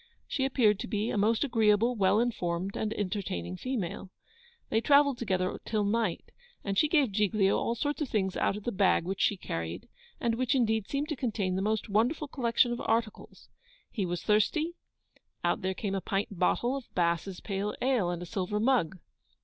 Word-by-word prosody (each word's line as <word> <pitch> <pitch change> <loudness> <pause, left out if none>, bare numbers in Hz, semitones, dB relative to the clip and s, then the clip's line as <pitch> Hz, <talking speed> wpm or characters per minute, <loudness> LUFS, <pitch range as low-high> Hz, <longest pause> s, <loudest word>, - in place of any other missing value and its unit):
She 265 - -1
appeared 220 -7 +3
to - - -4
be 210 +1 -1
a - - -2
most 220 +5 +2
agreeable, 230 -2 +3
well 205 0 +3
informed, 190 -5 -1
and 215 - -2
entertaining 185 - -3
female. 200 - -4 0.6
They 220 - +2
travelled 280 -1 +4
together 185 -5 -1
till 215 -2 -1
night, 210 -3 -1 0.3
and 200 -1 -2
she 305 - +4
gave 290 -7 +3
Giglio 205 -1 +2
all 235 - -1
sorts 290 +5 -2
of 290 - -1
things 190 -3 0
out 195 - 0
of 210 - -9
the 240 - -2
bag 190 -4 +2
which 190 +2 -3
she 205 - +2
carried, 85 - -5 0.3
and 235 -2 0
which 255 +4 0
indeed 220 -4 +1
seemed 285 +2 -2
to 305 - -1
contain 210 -7 -1
the 190 - -1
most 215 +2 0
wonderful 235 +9 +1
collection 240 -2 +2
of 240 - -3
articles. 225 -1 -2 0.4
He 200 -5 -2
was 175 -1 -3
thirsty 300 +11 +2 0.7
out 175 - +1
there 190 0 -1
came 200 -1 -3
a 195 - -1
pint 200 +3 -1
bottle 240 +7 +2
of 275 -3 -7
Bass's 175 +1 0
pale 200 0 -3
ale, 250 -8 +1
and 175 0 -3
a - - -6
silver 190 +3 -2
mug! 225 -7 +2
210 Hz, 190 wpm, -29 LUFS, 190-240 Hz, 0.7 s, travelled